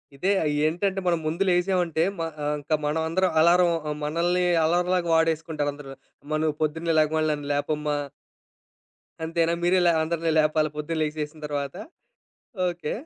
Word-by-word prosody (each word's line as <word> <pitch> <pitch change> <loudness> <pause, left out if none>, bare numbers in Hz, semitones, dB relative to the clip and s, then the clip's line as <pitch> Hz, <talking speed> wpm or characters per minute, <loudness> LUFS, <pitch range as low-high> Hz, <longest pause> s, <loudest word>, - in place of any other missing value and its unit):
ఇదే. 185 +8 0 0.3
ఏంటంటే 190 +4 0
మనం 170 -2 +2
ముందు 165 +5 0
లేసామంటే, 175 -2 +1 0.2
మ - - -1 0.2
ఆహ్, 150 0 0
ఇంకా 150 +2 0
మనం 150 +2 0
అందరం 185 +3 +1
అలారం 175 +2 +5 0.2
ఆహ్, 150 - -3
మనల్ని 175 +4 +1 0.2
అలరంలాగా 175 +1 +1
వాడేసుకుంటారుందరు. 155 -3 -1 0.3
అమ్మ 155 +1 -2
నువ్వు 155 -1 0
పొద్దున్నే 160 +2 -1
లెగవగాలనే 155 0 +2
నన్ను 145 -1 -6
లేపమ్మా. 150 0 -1 1.3
అంతేనా? 165 +1 +1
మీరే 180 +2 +3
లే 170 - +6
అందరిని 165 0 -1
లేపాలా 155 0 +2
పొద్దున 155 +2 -3
లేసేసిన 150 0 -4
తర్వాత? 140 -1 -3 0.9
ఓకే. 175 -3 -4
160 Hz, 140 wpm, -25 LUFS, 150-175 Hz, 1.3 s, లే